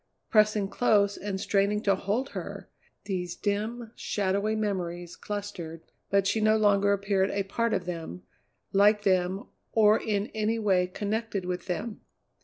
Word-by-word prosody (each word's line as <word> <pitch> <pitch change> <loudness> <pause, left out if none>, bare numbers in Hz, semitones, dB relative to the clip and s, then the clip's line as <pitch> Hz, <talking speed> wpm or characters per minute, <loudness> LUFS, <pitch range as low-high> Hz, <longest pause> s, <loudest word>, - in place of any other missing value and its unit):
Pressing 215 -2 +4
close 205 -2 +2
and 195 -1 -4
straining 200 +1 +1
to 200 - +4
hold 205 +8 -1
her, - - -7 0.4
these 180 -3 -3
dim, 220 +3 -2
shadowy 200 +2 0
memories 175 -5 -3
clustered, 175 -6 -6 0.3
but 200 -1 +3
she 220 +2 +1
no 215 0 +4
longer 200 -1 +3
appeared 195 -1 +1
a 200 - -1
part 230 +4 -1
of 180 - -1
them, 165 - -6 0.5
like 205 +1 +5
them, 185 0 +1 0.3
or 215 -1 +5
in 205 -2 0
any 220 +1 0
way 190 -4 +2
connected 205 +1 -3
with 180 0 -4
them. 205 +5 -4
200 Hz, 145 wpm, -28 LUFS, 190-215 Hz, 0.5 s, like